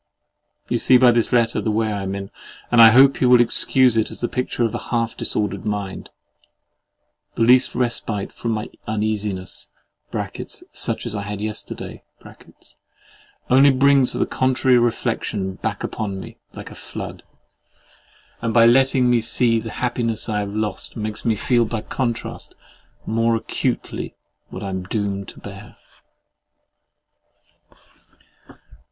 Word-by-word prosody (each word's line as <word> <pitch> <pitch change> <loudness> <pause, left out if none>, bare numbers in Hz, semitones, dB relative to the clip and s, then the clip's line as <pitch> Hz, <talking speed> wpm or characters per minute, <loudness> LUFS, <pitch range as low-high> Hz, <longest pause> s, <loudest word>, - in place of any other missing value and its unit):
— - - -50
You 120 - 0
see 130 - +5
by 125 -1 +6
this 120 -1 +1
letter 120 -2 +2
the - - -2
way 110 0 0
I 100 - -3
am 95 0 -4
in, 100 0 -7 0.4
and 120 -1 +6
I 115 - +10
hope 135 +4 +5
you 125 - +4
will 125 -1 +7
excuse 125 +1 +4
it 110 - +1
as - - -9
the 120 - -1
picture 125 -1 -2
of 115 - 0
a - - -6
half 115 -1 -1
disordered 100 -2 -2
mind. 105 -2 -4 1.3
The - - +1
least 125 +2 +4
respite 115 -4 -2
from 115 - -5
my 110 -1 -4 0.2
uneasiness 105 -3 -2 1.0
(such - - -2
as - - -4
I 100 - -3
had 100 0 -5
yesterday) 105 0 -6 1.5
only 135 +2 +7
brings 135 -1 +4
the - - 0
contrary 130 -1 +2
reflection 110 -4 -1
back - - -4
upon 100 -3 -4
me, - - -10 0.2
like - - -9
a - - -9
flood; - - -8 1.2
and 115 0 -2
by 115 -1 +7
letting 130 +1 +4
me 120 -1 +3
see 115 0 +2
the 115 - -7
happiness 120 -2 -1
I 105 -2 -1
have 100 -1 -3
lost, 105 0 -4
makes 105 -1 -4
me 115 -2 +2
feel, 120 +3 +2
by 110 0 -4
contrast, 120 -1 -4 0.5
more 115 +1 +1
acutely 115 - -3 0.3
what 95 - -8
I 100 - -4
am 95 -1 -3
doomed 100 0 -3
to - - -12
bear. 100 0 -11
115 Hz, 145 wpm, -21 LUFS, 105-120 Hz, 1.5 s, I